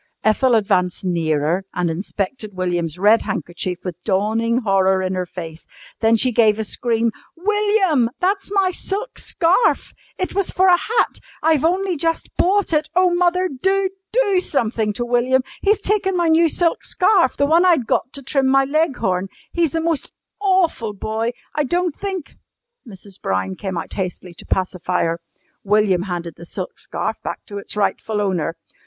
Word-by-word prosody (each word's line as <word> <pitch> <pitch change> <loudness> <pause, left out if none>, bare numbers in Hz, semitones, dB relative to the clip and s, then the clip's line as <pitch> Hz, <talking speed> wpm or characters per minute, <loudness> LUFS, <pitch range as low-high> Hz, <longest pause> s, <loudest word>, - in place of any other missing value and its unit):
Ethel 240 +3 +3
advanced 185 -4 +1
nearer 165 0 0
and 175 -2 0
inspected 200 +4 -4
William's 175 -3 -2
red 210 +4 +5
handkerchief 175 -1 -3
with 180 -1 -6
dawning 225 +4 +1
horror 190 -3 +2
in 185 0 -1
her 185 -1 -2
face. 165 -2 -8 0.4
Then 225 0 +4
she 255 +3 +2
gave 220 -3 +4
a 220 - -1
scream. 230 +1 0 0.3
"William, 395 - +2
that's 390 +2 0
my 390 -2 +2
silk 405 +6 -4
scarf! 350 +8 +2 0.2
It 370 - -3
was 395 -1 0
for 375 +1 +3
a - - +7
hat. 450 +6 0 0.2
I've 315 -3 +3
only 365 +1 +1
just 330 +2 -2
bought 390 -1 +2
it. 305 0 +1
Oh, 365 -1 +4
mother, 360 +1 +2
do 380 +6 0 0.2
do 420 -6 +3
something 225 - 0
to 240 +4 -3
William! 250 +2 +2 0.2
He's 415 +1 +3
taken 385 -2 +1
my 340 -1 +2
new 325 +1 +5
silk 335 +1 0
scarf 365 -7 +3
the 285 - +3
one 325 +4 +4
I'd 340 -9 +4
got 240 - 0
to 275 - -9
trim 270 0 +1
my 270 0 +4
Leghorn. 265 - 0 0.3
He's 335 -4 +1
the 325 - -1
most 325 -3 -1 0.3
awful 370 - +1
boy. 220 +3 -2 0.2
I 300 - +1
don't 345 +3 0
think 380 -6 -5 0.2
" 480 - -30
Mrs. 195 0 -12
Brown 95 0 -1
came 190 -3 -4
out - - -5
hastily 185 -1 -4
to - - -12
pacify 180 -1 -1
her. 165 0 -1 0.4
William 205 -3 +3
handed 170 -2 -4
the 170 - -10
silk - - -6
scarf - - -3
back - - -5
to 205 -1 -6
its 200 - -8
rightful 210 +1 0
owner. 180 -5 -1
240 Hz, 170 wpm, -20 LUFS, -, 0.4 s, a